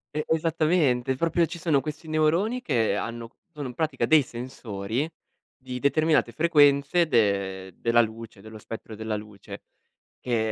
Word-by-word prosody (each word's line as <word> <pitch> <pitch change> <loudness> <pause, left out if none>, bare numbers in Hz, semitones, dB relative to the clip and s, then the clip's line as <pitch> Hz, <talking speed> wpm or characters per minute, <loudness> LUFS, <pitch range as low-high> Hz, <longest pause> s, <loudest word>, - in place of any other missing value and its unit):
E 155 - -1
esattamente, 155 -5 +1
proprio 170 +3 +1
ci 170 +1 -8
sono 155 -5 +2
questi 155 +1 -7
neuroni, 165 +10 +1
che 115 - +1
hanno 115 +2 -5 0.2
sono 145 -4 -6
in 125 - -9
pratica 155 -3 -1
dei 155 -2 +6
sensori 120 0 -4 0.5
di 130 -1 -7
determinate 150 -2 +2
frequenze 145 +2 +3
de 100 - 0
della 115 0 +3
luce, 110 -2 -6
dello 110 +1 -11
spettro 110 +1 -9
della 110 0 -3
luce, 105 -2 -9 0.6
che 110 -3 0
130 Hz, 145 wpm, -26 LUFS, 110-155 Hz, 0.6 s, dei